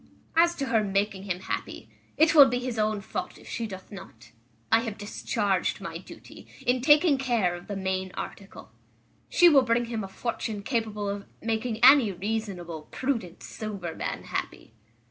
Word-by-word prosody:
As 340 Hz, +1 st, +4 dB
to 275 Hz, -, -2 dB
her 230 Hz, -3 st, +2 dB
making 200 Hz, 0 st, -1 dB
him 185 Hz, -2 st, -3 dB
happy, -, -, -5 dB, 0.3 s
it 320 Hz, +2 st, +5 dB
will 285 Hz, -4 st, +9 dB
be 245 Hz, -, 0 dB
his 250 Hz, -2 st, -3 dB
own 215 Hz, -1 st, 0 dB
fault -, -, -5 dB
if -, -, -16 dB
she 230 Hz, -, -3 dB
doth 190 Hz, -2 st, -10 dB
not. 185 Hz, -, -12 dB, 0.4 s
I 225 Hz, -, +6 dB
have 225 Hz, -3 st, -4 dB
discharged 205 Hz, -2 st, -1 dB
my -, -, -6 dB
duty, -, -, -13 dB, 0.2 s
in 250 Hz, +1 st, +2 dB
taking 295 Hz, +1 st, +5 dB
care 235 Hz, -9 st, +1 dB
of 175 Hz, 0 st, -9 dB
the 205 Hz, -, -4 dB
main 190 Hz, -1 st, -2 dB
article. 195 Hz, -1 st, -8 dB, 0.6 s
She 350 Hz, -, +6 dB
will 290 Hz, -5 st, +7 dB
bring 240 Hz, -1 st, +1 dB
him 230 Hz, -2 st, -4 dB
a -, -, -5 dB
fortune 215 Hz, 0 st, -4 dB
capable 215 Hz, -3 st, -2 dB
of 200 Hz, 0 st, -4 dB
making 225 Hz, +1 st, -2 dB
any 260 Hz, -5 st, +7 dB
reasonable, 185 Hz, -5 st, -4 dB
prudent, 230 Hz, -10 st, -3 dB
sober 200 Hz, -6 st, -6 dB
man, -, -, -4 dB
happy." -, -, -5 dB
215 Hz, 170 wpm, -27 LUFS, 195-245 Hz, 0.6 s, will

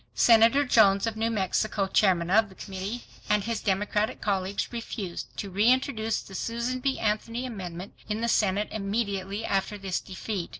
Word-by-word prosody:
Senator 230 Hz, +5 st, +5 dB
Jones 200 Hz, -5 st, +5 dB
of 225 Hz, -1 st, -2 dB
New 225 Hz, +1 st, 0 dB
Mexico, 205 Hz, -1 st, 0 dB
Chairman 185 Hz, -3 st, +2 dB
of 220 Hz, +1 st, +4 dB
the 190 Hz, -, -15 dB
Committee, 195 Hz, +5 st, -5 dB, 0.3 s
and 210 Hz, -1 st, +3 dB
his 230 Hz, +1 st, -2 dB
Democratic 210 Hz, +2 st, 0 dB
colleagues 195 Hz, +2 st, -2 dB
refused 210 Hz, -6 st, -5 dB
to 200 Hz, -, -5 dB
reintroduce 225 Hz, +2 st, +2 dB
the 195 Hz, -, -13 dB
Susan 235 Hz, +5 st, -2 dB
B. 265 Hz, +1 st, 0 dB
Anthony 230 Hz, +3 st, -1 dB
amendment 185 Hz, -5 st, -7 dB, 0.2 s
in 210 Hz, +1 st, -1 dB
the 235 Hz, -, 0 dB
Senate 210 Hz, -2 st, +1 dB
immediately 200 Hz, -1 st, -2 dB
after 195 Hz, +2 st, -1 dB
this 195 Hz, -2 st, -2 dB
defeat. 190 Hz, -1 st, -5 dB
210 Hz, 160 wpm, -27 LUFS, 195-230 Hz, 0.3 s, Senator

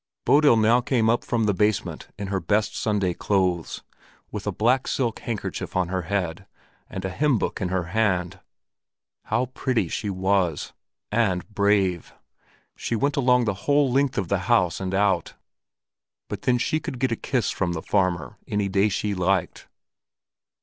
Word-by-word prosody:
Bodil 145 Hz, -5 st, +5 dB
now 115 Hz, +3 st, +4 dB
came 120 Hz, -4 st, +2 dB
up 120 Hz, -, 0 dB
from 115 Hz, -2 st, 0 dB
the 105 Hz, -1 st, +2 dB
basement 105 Hz, +2 st, -1 dB
in 100 Hz, -1 st, -5 dB
her 95 Hz, -1 st, 0 dB
best 105 Hz, +4 st, 0 dB
Sunday 100 Hz, -5 st, 0 dB
clothes, 90 Hz, -3 st, -1 dB, 0.5 s
with -, -, -5 dB
a -, -, +1 dB
black 125 Hz, +4 st, +1 dB
silk 120 Hz, -4 st, -1 dB
handkerchief 115 Hz, -4 st, -5 dB
on 90 Hz, -2 st, +1 dB
her 95 Hz, 0 st, -1 dB
head 95 Hz, 0 st, -3 dB, 0.4 s
and 95 Hz, 0 st, -5 dB
a 95 Hz, -, -2 dB
hymn 140 Hz, +5 st, +2 dB
book -, -, -3 dB
in 90 Hz, -, -1 dB
her 95 Hz, -1 st, 0 dB
hand. 90 Hz, -1 st, 0 dB, 0.9 s
How 125 Hz, -, +1 dB
pretty 120 Hz, -9 st, 0 dB
she 105 Hz, -, -3 dB
was! 95 Hz, -4 st, 0 dB, 0.4 s
And 100 Hz, -5 st, +1 dB
brave! 100 Hz, -4 st, +1 dB, 0.6 s
She 115 Hz, -, -3 dB
went 140 Hz, +5 st, 0 dB
along 125 Hz, -3 st, +3 dB
the 105 Hz, -, 0 dB, 0.2 s
whole 145 Hz, -2 st, +4 dB
length 135 Hz, +1 st, +1 dB
of 95 Hz, -4 st, 0 dB
the 100 Hz, +2 st, +1 dB
House 90 Hz, -8 st, +3 dB
and 95 Hz, 0 st, -2 dB
out! 95 Hz, -4 st, +1 dB, 0.9 s
But -, -, -5 dB
then 125 Hz, -1 st, +2 dB
she 155 Hz, +6 st, 0 dB
could 130 Hz, -, -6 dB
get 130 Hz, 0 st, 0 dB
a -, -, +1 dB
kiss 120 Hz, -4 st, -1 dB
from 90 Hz, -3 st, -1 dB
the 80 Hz, -, -5 dB
farmer 90 Hz, -3 st, 0 dB
any 105 Hz, -1 st, -1 dB
day 100 Hz, +2 st, +3 dB
she 105 Hz, +1 st, -1 dB
liked. 95 Hz, 0 st, -1 dB
100 Hz, 170 wpm, -24 LUFS, 95-120 Hz, 0.9 s, Bodil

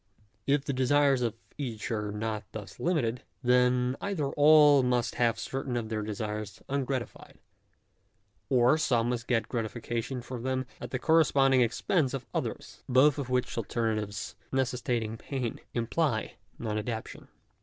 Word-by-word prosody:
If 140 Hz, 0 st, +2 dB
the 140 Hz, -, -1 dB
desires 135 Hz, +1 st, +3 dB
of 115 Hz, -2 st, 0 dB, 0.2 s
each 120 Hz, -4 st, -4 dB
are 105 Hz, -2 st, -2 dB
not 110 Hz, 0 st, -3 dB
thus 105 Hz, -2 st, -8 dB
limited, 125 Hz, -9 st, 0 dB, 0.2 s
then 125 Hz, 0 st, +3 dB
either 170 Hz, -9 st, -1 dB
all 150 Hz, -1 st, +7 dB
must 125 Hz, -2 st, +1 dB
have 115 Hz, -1 st, +3 dB
certain 130 Hz, +1 st, -3 dB
of 110 Hz, -2 st, -3 dB
their 110 Hz, -1 st, -2 dB
desires 105 Hz, 0 st, -4 dB
ungratified; 135 Hz, -3 st, -3 dB, 1.1 s
or 130 Hz, +4 st, +4 dB
some 120 Hz, -5 st, +2 dB
must 120 Hz, -1 st, -3 dB
get 115 Hz, -3 st, +1 dB
gratification 120 Hz, +2 st, -3 dB
for 125 Hz, -1 st, -6 dB
them 130 Hz, +1 st, -1 dB, 0.2 s
at -, -, -5 dB
the 130 Hz, -, -2 dB
corresponding 135 Hz, -3 st, +4 dB
expense 135 Hz, -, +1 dB
of 130 Hz, -3 st, -6 dB
others. -, -, -4 dB
Both 130 Hz, +3 st, +5 dB
of 135 Hz, -3 st, -4 dB
which 125 Hz, 0 st, 0 dB
alternatives 110 Hz, -5 st, -2 dB, 0.2 s
necessitating 120 Hz, -4 st, -1 dB
pain, 125 Hz, -2 st, -4 dB, 0.2 s
imply 120 Hz, -1 st, -1 dB, 0.2 s
non 110 Hz, -2 st, -2 dB
adaptation. 110 Hz, 0 st, -5 dB
125 Hz, 140 wpm, -29 LUFS, 115-135 Hz, 1.1 s, all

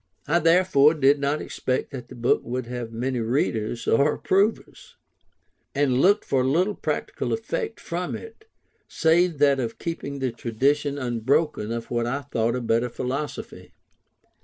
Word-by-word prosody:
I 165 Hz, +4 st, +3 dB
therefore 165 Hz, -3 st, +4 dB
did 140 Hz, -1 st, +4 dB
not 140 Hz, +2 st, -1 dB
expect 130 Hz, +2 st, -2 dB
that 125 Hz, -4 st, -7 dB
the -, -, -11 dB
book 120 Hz, 0 st, +2 dB
would 125 Hz, +1 st, -3 dB
have 120 Hz, -1 st, -5 dB
many 125 Hz, +2 st, -2 dB
readers, 115 Hz, -1 st, -1 dB
or 140 Hz, +6 st, +3 dB
approvers; 200 Hz, +4 st, -1 dB, 0.8 s
and 135 Hz, -2 st, +2 dB
looked 205 Hz, +3 st, +4 dB
for 130 Hz, -2 st, +1 dB
little 175 Hz, +10 st, +2 dB
practical -, -, -3 dB
effect 455 Hz, 0 st, -3 dB
from -, -, -4 dB
it, 450 Hz, -1 st, -11 dB, 0.4 s
save 165 Hz, 0 st, +2 dB
that 140 Hz, -1 st, +4 dB
of 115 Hz, -3 st, -3 dB
keeping 140 Hz, -4 st, -5 dB
the 130 Hz, -2 st, -1 dB
tradition 140 Hz, +5 st, 0 dB
unbroken 125 Hz, -1 st, 0 dB
of 115 Hz, 0 st, -5 dB
what 120 Hz, -1 st, 0 dB
I 140 Hz, +4 st, -2 dB
thought 115 Hz, -4 st, -1 dB
a 125 Hz, -, -2 dB
better 115 Hz, +1 st, +1 dB
philosophy. 135 Hz, +5 st, -5 dB
135 Hz, 150 wpm, -24 LUFS, 120-155 Hz, 0.8 s, therefore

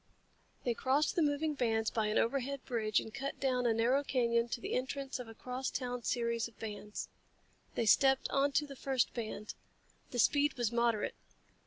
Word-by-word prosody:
They 240 Hz, -, +1 dB
crossed 270 Hz, +5 st, +1 dB
the 345 Hz, -, +3 dB
moving 300 Hz, +1 st, +1 dB
bands 225 Hz, -5 st, +1 dB
by 220 Hz, -2 st, 0 dB
an 210 Hz, -, +1 dB
overhead 275 Hz, +3 st, 0 dB
bridge 220 Hz, -4 st, +1 dB
and 220 Hz, -, -8 dB
cut 275 Hz, +4 st, -4 dB
down 250 Hz, -2 st, +1 dB
a -, -, +4 dB
narrow 250 Hz, +5 st, +3 dB
canyon 235 Hz, -3 st, +1 dB
to 235 Hz, -, -2 dB
the -, -, -4 dB
entrance 265 Hz, +1 st, -2 dB
of 250 Hz, -, -6 dB
a 225 Hz, -, -11 dB
crosstown 250 Hz, 0 st, -3 dB
series 235 Hz, 0 st, 0 dB
of 230 Hz, -, -19 dB
bands. 210 Hz, -1 st, -6 dB, 0.7 s
They 230 Hz, -, +1 dB
stepped 265 Hz, +4 st, +5 dB
onto 280 Hz, +1 st, +2 dB
the 280 Hz, -1 st, -9 dB
first 265 Hz, -2 st, 0 dB
band. 215 Hz, -3 st, -5 dB, 0.6 s
The 245 Hz, -, -5 dB
speed 290 Hz, +5 st, +3 dB
was 240 Hz, -3 st, 0 dB
moderate. 235 Hz, -2 st, +1 dB
245 Hz, 175 wpm, -34 LUFS, 230-275 Hz, 0.7 s, stepped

